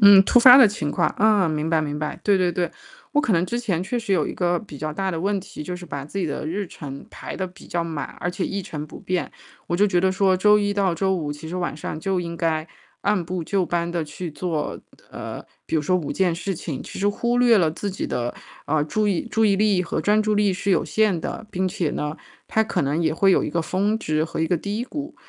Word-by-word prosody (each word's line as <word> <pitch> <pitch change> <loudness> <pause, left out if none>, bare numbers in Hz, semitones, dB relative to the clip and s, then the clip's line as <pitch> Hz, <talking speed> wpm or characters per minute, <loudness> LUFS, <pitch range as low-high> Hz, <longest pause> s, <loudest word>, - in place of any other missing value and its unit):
嗯， 200 -2 +9
突 245 +5 +4
发 250 +1 +10
的 260 -5 +9
情 155 -8 -2
况， - - +1
啊， 210 -3 +4
明 155 0 -1
白 160 -1 +2
明 150 -1 -3
白， 150 -1 -4
对 200 -2 +4
对 180 -1 +2
对。 175 -1 -1 0.4
我 295 - +4
可 255 - -1
能 165 +2 +2
之 235 +6 -2
前 185 -7 -1
确 240 +6 -2
实 215 - -6
有 155 - +1
一 - - -4
个 175 -1 +1
比 150 -10 -11
较 155 +1 -3
大 190 +5 -2
的 165 -2 -3
问 200 +1 0
题， 180 -4 -8
就 180 +4 -5
是 180 - -9
把 140 -4 -5
自 175 +7 -6
己 185 - 0
的 150 0 -3
日 195 +4 -2
程 140 -4 -8
排 - - -7
得 190 - -2
比 180 - -14
较 170 -1 -1
满， 160 -3 -4
而 175 - -2
且 180 +1 -2
一 195 -1 -3
成 150 -3 -6
不 - - -11
变。 180 -1 -2 0.4
我 175 - -1
就 205 - +4
觉 180 -3 +2
得 190 +1 +3
说 190 0 +3
周 210 +3 +5
一 205 -1 0
到 195 -4 +1
周 190 +3 +1
五， 155 -5 -2
其 145 +2 -7
实 170 - -6
晚 175 -4 -2
上 155 0 -5
就 190 +1 0
应 170 -1 -4
该 160 -1 0 0.4
按 205 -3 +2
部 175 0 -4
就 190 -1 0
班 170 0 -1
地 170 -2 0
去 155 +3 -6
做 155 0 -3 0.3
呃， - - -7 0.2
比 160 - 0
如 150 - +1
说 185 +5 +1
5 175 -5 -1
件 180 -3 +1
事 190 +2 -3
情， 155 -4 -5
其 - - -9
实 200 - +1
忽 235 +4 +1
略 245 -3 +5
了 165 -4 +3
自 200 +5 -4
己 190 - -4
的， 120 0 -2 0.3
呃， 150 0 +1
注 210 +7 0
意 190 -5 +1
注 220 0 +2
意 200 -2 +4
力 200 -3 +3
和 170 - -2
专 210 +1 +3
注 215 0 +1
力， 205 -2 +2
是 200 +1 -2
有 - - +3
限 185 +1 +1
的。 215 - -5
并 185 -1 0
且 175 -3 -1
呢， 150 +1 -3 0.3
它 220 - +2
可 - - -1
能 145 +4 0
也 160 - +2
会 195 +4 +3
有 - - +3
一 - - -3
个 170 - 0
峰 200 +6 0
值 155 -5 0
和 160 - -4
一 160 - +2
个 175 - +1
低 205 +7 -3
谷， 295 +2 -6
180 Hz, 285 characters per minute, -23 LUFS, 160-200 Hz, 0.4 s, 发